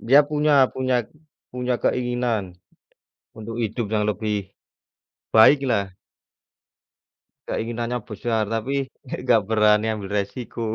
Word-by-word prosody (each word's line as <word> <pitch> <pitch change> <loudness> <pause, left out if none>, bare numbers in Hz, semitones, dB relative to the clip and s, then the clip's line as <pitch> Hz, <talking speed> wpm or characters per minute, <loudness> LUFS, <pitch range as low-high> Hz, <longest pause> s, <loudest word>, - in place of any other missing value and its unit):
Dia 140 +5 +5
punya 150 -2 +3
punya 130 -2 0 0.5
punya 125 0 -1
keinginan, 120 -8 -1 0.8
untuk 115 +1 -7
hidup 110 -1 -2
yang 105 -1 +1
lebih, 105 -2 -3 0.8
baik 135 +5 +6
lah. 100 -6 0 1.6
Keinginannya 120 +2 -2
besar 110 +1 -1
tapi 115 +4 -2 0.3
nggak - - -5
nggak 120 -3 +4
berani 105 -1 +4
ambil 100 -2 -7
resiko. 115 +4 -7
115 Hz, 105 wpm, -23 LUFS, 105-125 Hz, 1.6 s, baik